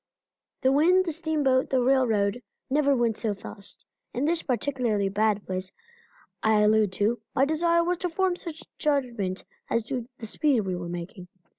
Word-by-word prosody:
The 260 - +3
wind, 355 +7 +4
the 335 - -1
steamboat, 300 -5 +1
the 260 - +2
railroad, 245 -4 +2 0.3
never 280 -1 +3
went 235 -3 +1
so 215 -3 -1
fast. 200 0 -8 0.3
In 255 +4 0
this 330 +1 +1
particularly 240 -5 0
bad 210 0 +1
place 185 0 -4 0.7
I 220 -1 +3
allude 210 -1 +4
to, 210 +4 0
my 270 - +4
desire 335 +3 +2
was 350 0 -1
to 360 - -1
form 370 +2 +1
some 340 -2 -4 0.3
judgment 240 - -1 0.2
as 230 - +1
to 240 +1 -4
the 225 - -7
speed 265 +2 +1
we 190 -3 -2
were 175 -1 -5
making. 175 +1 -7
245 Hz, 165 wpm, -26 LUFS, 210-300 Hz, 0.7 s, wind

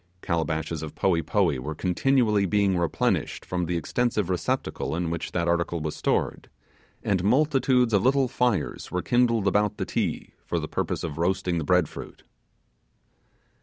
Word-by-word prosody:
Calabashes 80 -2 -1
of 80 -2 -7
poee 85 -4 +2
poee 85 - +1
were 75 +5 -5
continually 105 - +2
being 100 0 +2
replenished 85 -3 0
from 90 -2 -2
the 90 0 0
extensive 105 +2 0
receptacle 90 -4 -2
in 85 -1 -2
which 85 +1 -4
that 85 -1 -1
article 85 0 0
was 75 -1 -3
stored, - - -1 0.5
and 95 -3 0
multitudes 130 0 +3
of 100 - +4
little 135 +1 +3
fires 120 -4 -1
were 90 -1 -2
kindled 115 -2 +2
about 105 +1 +2
the - - -2
Ti - - -2
for - - -2
the - - -2
purpose - - -2
of 80 -2 -5
roasting 90 0 0
the - - -2
bread 90 0 +3
fruit. - - -10
90 Hz, 160 wpm, -26 LUFS, 85-110 Hz, 0.5 s, of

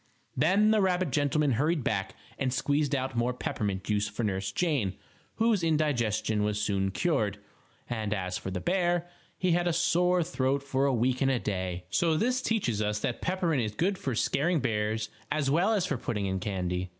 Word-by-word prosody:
Then 195 +10 +4
the 215 -1 +4
rabbit 185 -4 +1
gentleman 145 0 +2
hurried 150 +5 +1
back - - -1 0.2
and 130 -1 0
squeezed 145 +2 +1
out 130 -1 -2
more 120 +1 0
peppermint 100 -6 -2
juice 105 -1 0
for 110 +3 -4
Nurse 95 -2 -1
Jane, 130 - 0 0.4
whose 220 -5 +2
indigestion 120 -10 +1
was 105 0 0
soon 100 -2 0
cured. 105 - 0 0.5
And 110 -3 -3
as 90 -3 -2
for - - -4
the 95 -1 -3
bear, 175 -1 +1 0.3
he 185 -1 +1
had 175 +1 +2
a 175 - +2
sore 175 +1 +2
throat 140 -4 0
for 135 0 +1
a - - +3
week 125 +1 +1
and 135 - +3
a 130 - +2
day. 90 -4 -3
So 165 -2 +2
this 250 +7 +1
teaches 155 - 0
us 105 0 0
that 120 - -2
peppermint 180 -7 0
is 105 -2 -3
good 190 - +1
for 130 -4 -2
scaring 160 +8 +1
bears, 110 -2 -1 0.2
as 150 -2 +1
well 175 +8 +3
as 200 -5 +2
for 150 - -1
putting 105 -4 -2
in 95 0 -1
candy. 90 -2 -2
135 Hz, 190 wpm, -29 LUFS, 105-170 Hz, 0.5 s, Then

